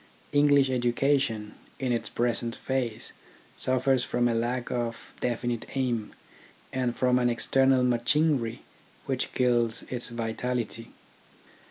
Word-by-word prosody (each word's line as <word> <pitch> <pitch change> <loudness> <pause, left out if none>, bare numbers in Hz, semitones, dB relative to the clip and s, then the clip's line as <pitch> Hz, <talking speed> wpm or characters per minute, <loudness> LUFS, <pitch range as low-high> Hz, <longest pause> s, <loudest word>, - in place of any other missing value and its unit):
English 145 -1 +5
education 120 -3 +1 0.2
in 130 -2 -1
its 120 - -1
present 120 -1 -1
phase 125 -4 -2 0.4
suffers 130 0 +2
from 120 0 +1
a 120 - +1
lack 120 +2 -1
of 120 -1 -3
definite 120 -1 -2
aim, 120 -5 -1 0.6
and 125 -2 0
from 125 0 +3
an 120 -1 +3
external 130 +2 +3
machinery 125 0 +1 0.4
which - - -1
kills 120 -2 +2
its 125 -1 -1
vitality. 115 0 -3
120 Hz, 115 wpm, -28 LUFS, 115-130 Hz, 0.6 s, English